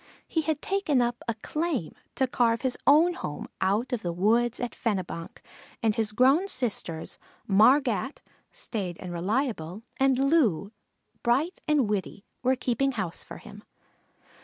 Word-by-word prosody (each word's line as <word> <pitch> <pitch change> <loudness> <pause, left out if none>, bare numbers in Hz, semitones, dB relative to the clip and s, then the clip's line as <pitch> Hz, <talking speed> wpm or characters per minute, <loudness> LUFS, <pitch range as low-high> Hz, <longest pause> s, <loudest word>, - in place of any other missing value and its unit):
He 320 - 0
had 315 -1 -2
taken 390 -9 +1
up 240 0 0
a 230 - -1
"claim" 305 - -2 0.2
to 265 - +2
carve 235 -2 +1
his 260 -2 0
own 320 +5 +6
home 150 - -6
out 205 +7 +1
of 240 - -1
the 175 - -2
woods 225 +7 +2
at 245 - -3
Fenebonk, 185 -6 -4 0.4
and 220 -1 +3
his 215 -1 0
grown 270 - +4
sisters, 205 - -1 0.3
Margat, 250 +5 +3 0.3
staid 185 -7 -4
and 180 -2 -6
reliable, 205 - -2
and 270 -1 +3
Loo, 265 - +2 0.5
bright 275 +10 +1
and 295 -6 +3
witty, 205 0 -3 0.2
were 255 +1 +3
keeping 260 +2 0
house 190 -7 -3
for - - -10
him. - - -12
240 Hz, 145 wpm, -27 LUFS, 200-275 Hz, 0.5 s, own